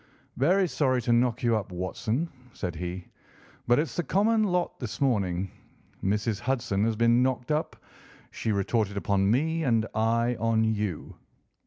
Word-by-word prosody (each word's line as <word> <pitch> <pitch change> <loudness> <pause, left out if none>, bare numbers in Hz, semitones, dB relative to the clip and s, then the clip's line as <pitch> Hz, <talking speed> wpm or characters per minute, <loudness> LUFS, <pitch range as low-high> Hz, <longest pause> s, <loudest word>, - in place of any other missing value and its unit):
"Very 180 +8 +3
sorry 130 -6 +1
to 120 - +2
knock 120 0 +2
you 120 -1 +3
up, 100 -3 -3
Watson," 110 - -2 0.3
said 90 -3 -4
he, 90 +2 -5 0.6
"but 120 +1 +5
it's 155 +2 -1
the - - +1
common 215 +7 +2
lot 180 -3 -1
this 120 -5 -5
morning. 95 -8 0 0.5
Mrs. 105 +2 0
Hudson 115 -5 0
has 115 -1 0
been 115 +2 +4
knocked 130 +1 0
up, 150 +1 -1 0.6
she 110 - -2
retorted 100 0 0
upon 100 -1 +1
me, 160 +8 +1
and 115 -5 +2
I 115 +2 +1
on 115 0 +2
you." 105 -6 -2
115 Hz, 155 wpm, -27 LUFS, 100-130 Hz, 0.6 s, but